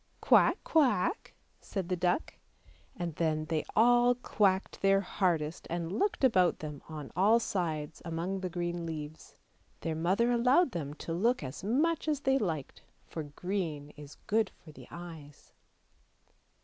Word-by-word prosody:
" - - -38
Quack! - - +5
quack! 295 - +1
" - - -39
said 190 -4 -2
the 180 - 0
duck; 180 - 0 0.6
and 175 -2 -4
then 155 -2 0
they 155 -1 -1
all 245 +2 +5
quacked 200 -5 0
their 195 0 +4
hardest, 170 -5 -1
and 170 0 -3
looked 390 -7 0
about 185 -9 +4
them 150 -2 -7
on 150 -3 -7
all 210 +6 +5
sides 160 -8 -3
among 170 +4 -3
the 185 -1 -3
green 175 -1 -3
leaves; 155 -1 -7 0.5
their 165 - -2
mother 190 +9 +1
allowed 250 +6 +4
them 150 -6 -4
to 165 - -5
look 230 +4 +1
as 130 +6 -7
much 300 +11 +1
as 300 -2 0
they 270 -1 +2
liked, 160 - -3 0.2
for 160 - -6
green 155 -1 -4
is 150 -1 -12
good 220 -1 +2
for 155 - -16
the - - -13
eyes. 160 -4 -11
175 Hz, 155 wpm, -31 LUFS, 160-225 Hz, 0.6 s, Quack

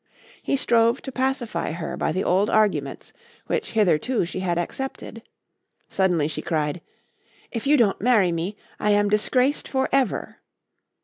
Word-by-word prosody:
He 275 - 0
strove 235 -1 +2
to 265 - -6
pacify 260 - -2
her 165 0 -5
by - - -1
the 185 - -1
old 195 +4 +2
arguments 215 -1 0 0.3
which 455 -3 -2
hitherto 215 +2 +2
she 180 - -5
had 175 -2 -1
accepted. 230 +5 -5 0.7
Suddenly 180 -6 +1
she 155 - -4
cried: 155 -1 -2 0.7
"If 230 +2 -4
you 295 +1 +5
don't 225 -6 +2
marry 215 -6 +4
me 170 +5 -3 0.2
I 210 - 0
am 205 0 +3
disgraced 250 +7 +1
for 265 -1 0
ever." 270 -5 0
210 Hz, 145 wpm, -24 LUFS, 180-255 Hz, 0.7 s, you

